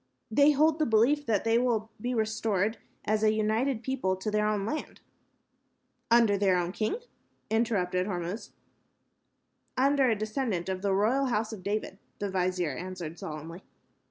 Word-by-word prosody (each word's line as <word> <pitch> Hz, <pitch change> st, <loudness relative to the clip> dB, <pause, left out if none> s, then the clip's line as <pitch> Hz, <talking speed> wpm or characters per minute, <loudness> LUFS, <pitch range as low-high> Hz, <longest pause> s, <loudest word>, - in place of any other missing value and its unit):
"They 285 Hz, +6 st, +5 dB
hold 305 Hz, +2 st, +3 dB
the 305 Hz, -, +2 dB
belief 250 Hz, +7 st, +3 dB
that 215 Hz, -4 st, +1 dB
they 230 Hz, +1 st, +3 dB
will 225 Hz, -3 st, 0 dB
be 245 Hz, +2 st, -1 dB
restored 220 Hz, -1 st, 0 dB, 0.3 s
as 215 Hz, 0 st, +1 dB
a 215 Hz, 0 st, +4 dB
united 220 Hz, +3 st, 0 dB
people 250 Hz, -7 st, 0 dB
to 190 Hz, +3 st, -4 dB
their 210 Hz, 0 st, +1 dB
own 210 Hz, -2 st, 0 dB
land." 305 Hz, +7 st, -4 dB, 1.1 s
"Under 230 Hz, -4 st, +4 dB
their 190 Hz, -2 st, +3 dB
own 175 Hz, 0 st, -1 dB
king?" 215 Hz, -, -1 dB, 0.6 s
interrupted 190 Hz, -5 st, +1 dB
Hormuz. 180 Hz, +2 st, -4 dB, 1.3 s
"Under 275 Hz, 0 st, +4 dB
a 225 Hz, -, +3 dB
descendant 215 Hz, -4 st, -2 dB
of 185 Hz, -1 st, -2 dB
the 195 Hz, -1 st, +1 dB
royal 235 Hz, +8 st, +2 dB
House 220 Hz, -2 st, -1 dB
of 205 Hz, -, -8 dB
David," 200 Hz, 0 st, -3 dB, 0.2 s
the 205 Hz, -1 st, -3 dB
vizier 180 Hz, -3 st, 0 dB
answered, 175 Hz, 0 st, -6 dB
solemnly. 160 Hz, +3 st, -7 dB
215 Hz, 155 wpm, -29 LUFS, 190-235 Hz, 1.3 s, They